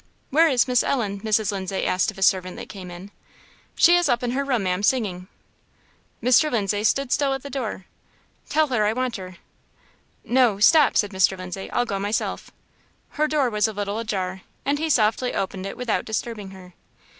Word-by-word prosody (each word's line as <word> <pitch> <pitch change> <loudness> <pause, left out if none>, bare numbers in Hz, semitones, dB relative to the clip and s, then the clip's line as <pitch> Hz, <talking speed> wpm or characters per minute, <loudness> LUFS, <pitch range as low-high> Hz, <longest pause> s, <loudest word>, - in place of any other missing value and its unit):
"Where 320 +4 +5
is 260 -3 +2
Miss 250 -1 +3
Ellen?" 210 -7 -1
Mrs. 215 -1 +1
Lindsay 190 -1 -3
asked 185 - +1
of - - -8
a 195 - -1
servant 185 -1 +2
that - - -8
came 185 -3 -9
in. 180 +3 -10 0.6
"She 345 0 +6
is 350 -4 +2
up 240 0 +1
in 240 - -1
her 275 +3 -1
room, 250 -6 0
Ma'am, 180 0 -1
singing." 205 -6 0 1.0
"Mr. 255 +5 +4
Lindsay 205 -2 0
stood 265 +4 +1
still 275 -2 +1
at 270 - -8
the 280 - -8
door." 230 -8 -4 0.6
"Tell 310 -1 +2
her 235 -5 +1
I 215 - +1
want 255 -1 -2
her." 185 -2 -9 0.9
"No 245 -5 +3
stop," 300 +7 +5
said 205 -1 +1
Mr. 190 0 +2
Lindsay;"I'll 185 +6 -3
go 200 -4 -3
myself." 205 +2 -2 0.6
Her 305 +1 0
door 290 -5 +1
was 210 0 +2
a 220 - -5
little 205 +1 -3
ajar, 190 -4 -3 0.2
and 285 +1 0
he 320 +1 -1
softly 230 -1 +1
opened 190 0 -3
it - - -7
without 250 -3 -1
disturbing 220 -2 -4
her. 185 -2 -13
215 Hz, 190 wpm, -23 LUFS, 195-255 Hz, 1.0 s, She